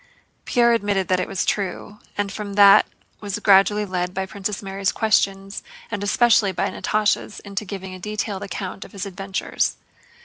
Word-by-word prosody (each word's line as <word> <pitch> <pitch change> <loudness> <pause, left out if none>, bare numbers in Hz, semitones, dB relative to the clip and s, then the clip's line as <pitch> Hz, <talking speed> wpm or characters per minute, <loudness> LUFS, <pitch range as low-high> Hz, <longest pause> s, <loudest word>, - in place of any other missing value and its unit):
Pierre 235 -2 +3
admitted 200 -5 0
that 185 -1 +2
it 185 - -1
was 195 - -2
true, 205 +1 -3 0.2
and 205 -1 -1
from 205 0 -6
that 200 0 +7 0.3
was 205 -1 -4
gradually 205 +1 +4
led 180 -1 -3
by 190 0 -1
Princess 200 +2 -4
Mary's 195 0 -1
questions 195 -2 0 0.3
and 205 -2 -3
especially 220 -1 +4
by 185 - -1
Natásha's 215 0 0
into 200 +1 -5
giving 190 -1 -7
a 185 - -9
detailed 210 0 -3
account 195 -1 -5
of - - -15
his 200 0 -5
adventures. 195 0 -2
200 Hz, 165 wpm, -22 LUFS, 190-210 Hz, 0.3 s, that